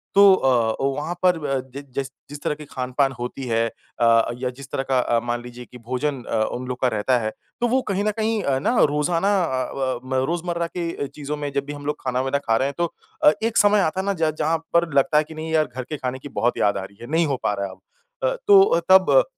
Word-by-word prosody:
तो 200 -1 +8
अ, 120 -7 +2
ओ - - +3
वहाँ 155 +4 -3
पर 180 -2 +4
अ, 135 -1 0 0.2
जि 140 - -5
जिस 135 -1 -1 0.2
जिस 145 0 -8
तरह 150 - 0
की 150 0 -10
खान-पान 130 +1 0
होती 125 +2 -5
है 115 0 +1
अ, 115 0 +1
या 125 0 -2
जिस 140 0 -10
तरह 135 - -1
का 130 - +4
अ, 120 -1 +2
मान 120 0 -2
लीजिए 125 0 -10
कि 125 - -10
भोजन 130 +2 -2
अ, 110 -1 0
उन 125 +1 -5
लोग 125 0 -4
का 130 - +4
रहता 125 +5 +2
है 110 -1 -2 0.3
तो 240 - +3
वो 260 +2 +2
कहीं 195 +1 0
न 215 - +2
कहीं 220 +1 +1
है 135 -1 +2
ना 240 - 0 0.2
रोजाना 165 +6 +1
अ, 130 -5 -2
व 130 -2 -1
म, 130 - -5 0.2
रोजमर्रा 170 0 -2
के 165 -4 -3
चीज़ों 150 +1 -6
में 145 -1 -4
जब 140 0 -1
भी 145 - -6
हम 145 0 -9
लोग 150 0 -1
खाना-वाना 130 +2 0
खा 115 0 +4
रहे 135 - +1
हैं 140 - -5
तो 170 -1 -1 0.3
अ, 150 - +8
एक 225 0 0
समय 205 0 +5
आता 185 +2 0
है - - -6
ना 200 - +1
ज 155 -1 +3
जहाँ 165 +2 +2 0.2
पर 170 -1 +3
लगता 140 +2 +3
है 155 - +5
कि 160 +1 -12
नहीं 160 +1 -5
यार 155 -1 +3
घर 130 - -3
के 150 - -3
खाने 130 0 -4
की 145 - -9
बहुत 120 +1 +1
याद 100 -1 +2
आ 95 - -4
रही 100 +1 -12
है, 120 - -8
नहीं 165 +1 +3
हो 135 -2 -1
पा 105 - +1
रहा 100 0 -2
है 95 - -6
अब। - - -15 0.5
अ, - - -2
तो 400 -1 +9
अ, 170 - +3
तब 190 - +6
140 Hz, 270 wpm, -23 LUFS, 125-170 Hz, 0.5 s, तो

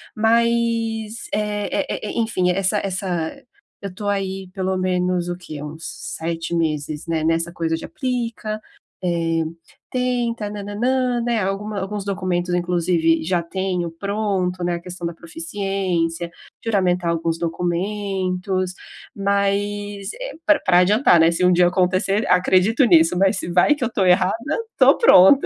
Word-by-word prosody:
Mas, 230 0 +1
e - - +3
e 210 +5 -2
e - - +4
enfim, 185 -5 +1
essa 195 +3 +1
essa 185 -4 -3 0.4
eu 200 - -4
estou 200 +3 -7
aí, 195 -1 -2
pelo 190 -1 -1
menos 180 -1 0
o 175 - -2
que, 155 -5 -8
uns 155 +2 -8
7 165 +1 -4
meses, 155 -2 -2
né, 165 -1 -1
nessa 165 +1 0
coisa 165 -1 -1
de - - -7
aplica, 235 -7 -3 0.4
eh, 165 -2 0 0.5
tenta 240 -4 -1
na 205 -1 -6
na 205 +1 -6
nan, 250 +1 +1
né, 235 -1 0
alguma 200 +2 -2
alguns 200 +1 -4
documentos, 185 -3 -1
inclusive, 170 -2 +1
já 175 0 0
tenho 180 -1 -2
pronto, 190 -1 -2
né, 175 0 0
a - - -4
questão 180 0 -7
da 170 - -2
proficiência, 170 0 -3 0.3
juramentar 180 -5 +1
alguns 165 0 -1
documentos, 185 +2 -2 0.4
mas, 200 0 -1
eh, - - -6
pra 310 -1 +5
pra 180 -2 +4
adiantar, 195 0 +5
né, 165 0 +6
se 170 +2 -1
um 180 - +5
dia 175 0 +5
acontecer, 185 +3 +1
acredito 185 +7 +4
nisso, 170 -4 +5
mas 195 +2 +3
se 180 - -4
vai 180 +12 +4
que 290 - -4
eu 235 - 0
estou 200 -5 0
errada, 180 +1 +4 0.4
estou - - +5
pronta. 275 - +7
185 Hz, 150 wpm, -21 LUFS, 175-210 Hz, 0.5 s, pronta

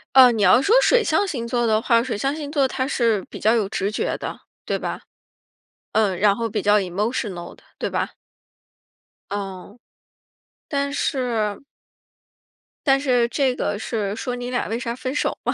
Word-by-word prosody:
呃， 255 -2 +9
你 215 -3 0
要 250 - +6
说 420 - +3
水 - - +4
象 330 +4 +1
星 240 -9 -3
座 240 0 0
的 220 -1 +2
话， 230 -2 +3
水 250 -4 -3
象 275 +7 -1
星 295 -2 -6
座 280 -3 +2
它 260 0 -2
是 230 -8 +1
比 - - -7
较 220 +3 +3
有 215 -4 +1
直 200 0 -2
觉 - - -1
的， - - -6 0.2
对 - - -1
吧？ - - -4 0.9
嗯， 200 -5 +2
然 205 0 +4
后 230 +1 -2
比 - - -2
较 210 +1 +4
emotional 195 -1 -3
的， - - -23 0.2
对 - - -2
吧？ - - -2 1.2
嗯， 200 +2 -6 0.9
但 280 -1 -1
是 230 -8 -1 1.3
但 270 -1 +5
是 250 -4 +2
这 265 -1 +1
个 205 -4 -2
是 210 -3 -2
说 245 +2 -3
你 245 0 -5
俩 245 - -1
为 225 - -2
啥 235 -1 -3
分 255 +1 -4
手 - - 0
吗？ - - 0
235 Hz, 220 characters per minute, -22 LUFS, 210-260 Hz, 1.3 s, 呃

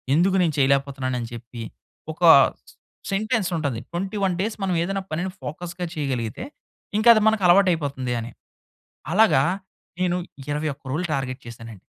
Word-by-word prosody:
ఎందుకు 185 +4 +3
నేను 165 -3 +1
చేయలేకపోతున్నాను 135 -1 +1
అని 115 - -5
చెప్పి, 120 0 -9 0.5
ఒక 160 - -13 0.9
సెంటెన్స్ 215 0 0
ఉంటది. 140 -7 -2
21 195 +2 -1
డేస్ 215 +2 -2
మనం 185 -2 0
ఏదైనా 195 +2 -2
పనిని 175 +4 -2
ఫోకస్‌గా 175 +3 -5
చేయగలిగితే, 130 -8 -3 0.5
ఇంక 215 - 0
అది 215 - +2
మనకు 220 -2 +2
అలవాటు 185 +2 +6
అయిపోతుంది 140 -6 -2
అని. 115 +1 -6 0.8
అలాగా 200 -7 +5 0.6
నేను 180 -1 +1 0.3
21 145 -1 -3
రోజులు 170 +6 -1
టార్గెట్ 130 -2 -3
చేశానండి. 115 -3 -10
160 Hz, 135 wpm, -23 LUFS, 130-190 Hz, 0.9 s, అలవాటు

